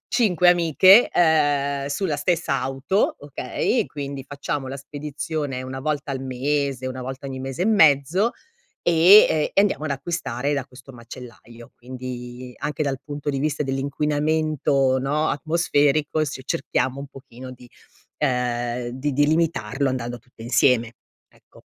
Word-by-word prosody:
5 180 -7 +4
amiche, 175 - +6
ehm, 145 -4 +2
sulla 150 +1 -2
stessa 160 -5 0
auto, 135 +9 0
okay, 145 - -2
quindi 140 -2 -6
facciamo 140 -1 -4
la 135 +1 -6
spedizione 145 -1 -5
una 130 +1 -6
volta 145 -1 -2
al 135 - -3
mese, 135 0 -2
una 130 0 -6
volta 130 +2 -7
ogni 130 -1 -6
mese 135 +5 -3
e - - -1
mezzo 175 - +4 0.5
e 170 -1 +6
e - - +3
andiamo 190 -6 0
ad - - -3
acquistare 140 -2 -3
da 140 -3 -2
questo 130 0 -14
macellaio, 120 0 -12
quindi 125 0 -8
anche 150 0 -3
dal 135 -2 -2
punto 145 0 -5
di 135 - -2
vista 150 +1 -1
dell'inquinamento, 140 0 0
no, 145 +4 0
atmosferico, 155 -1 +1
se 135 -3 -6
cerchiamo 135 0 -1
un 140 - -7
pochino 130 -2 -12
di, 125 -1 -14 0.5
ehm, 120 -2 -1
di 130 +4 -3
di 145 +2 +3
limitarlo 145 -5 0
andando 120 -1 -4
tutte 115 0 -16
insieme, 120 -1 +2 0.4
ecco. - - -22
140 Hz, 140 wpm, -23 LUFS, 130-155 Hz, 0.5 s, amiche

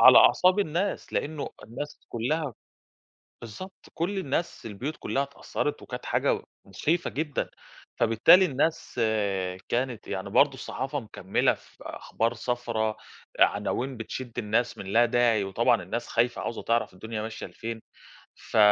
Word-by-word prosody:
على - - +10
أعصاب 185 +2 +6
الناس، 190 +2 -1
لأنه 150 -1 -2 0.2
الناس 145 +6 -6
كلّها 130 +3 -1 0.9
بالضبط، 150 - -9
كل 195 +4 -1
الناس، 150 -5 -2
البيوت 120 +9 -4
كلّها 140 - 0
اتأثّرِت 140 0 -3
وكانت - - -7
حاجة - - +1 0.2
مُخيفة 155 - 0
جدًا، 150 -1 -2 0.5
فبالتالي 115 - +6
الناس 150 -4 0 0.7
كانت 125 -1 -1
يعني 95 +1 -3
برضه 140 +5 +5
الصحافة 135 +2 -3
مكمّلة 105 -4 +1
في - - -20
أخبار 115 +2 -1
صفرا، 115 -2 -1 0.4
عناوين 130 +1 +2
بتشد 120 +2 -6
الناس 115 +2 0
من 95 - -7
لا 115 +5 +5
داعي 115 -3 +3
وطبعًا 115 +3 +2
الناس 115 +7 -4
خايفة 120 +1 +1
عاوزة 115 - -4
تعرف 115 -4 +1
الدنيا 110 +3 -5
ماشية 110 0 -5
لفين، 115 0 -6 0.5
ف - - -5
120 Hz, 130 wpm, -27 LUFS, 110-145 Hz, 0.9 s, على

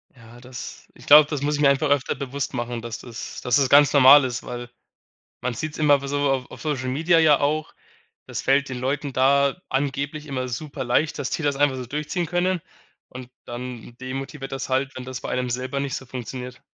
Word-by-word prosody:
Ja, 115 0 -15
das 125 -1 -9
ich - - -16
glaube, 150 0 +9
das 150 -3 -3
muss 145 +1 0
ich 145 - -2
mir 140 - +6
einfach 140 +2 +1
öfter 140 -2 +1
bewusst 140 0 -4
machen, 120 -1 -3
dass 115 -1 -6
das 120 -1 -8
dass 125 +3 +2
es 135 -2 +2
ganz 145 +1 +6
normal 140 0 +8
ist, 125 0 -4
weil 120 0 -7 0.7
man 125 - -2
sieht‘s 150 +6 -5
immer 145 -2 +4
w 140 - -6
so 145 0 0
auf 130 -2 -2
auf - - -11
Social 135 -5 -2
Media 165 +6 +3
ja 155 -3 +5
auch, 150 +2 -1 0.5
das - - -4
fällt 135 +1 +2
den 130 -1 -5
Leuten 140 +2 -2
da 140 +5 +3
angeblich 140 +2 -2
immer 130 -3 -3
super 135 +2 -5
leicht, 135 +6 0
dass 140 - -2
die 160 - -3
das 145 -1 +1
einfach 140 -1 +2
so 130 - -5
durchziehen 150 +7 -3
können 175 0 0 0.5
und 125 -1 -10 0.2
dann 120 -1 -7
demotiviert 135 +2 -6
das 135 -1 -4
halt, 135 +1 0
wenn 130 - -7
das 130 0 -6
bei - - -5
einem 125 0 -1
selber 130 +3 -3
nicht 140 -1 -2
so 130 - -7
funktioniert. 125 0 -7
135 Hz, 215 wpm, -23 LUFS, 125-145 Hz, 0.7 s, glaube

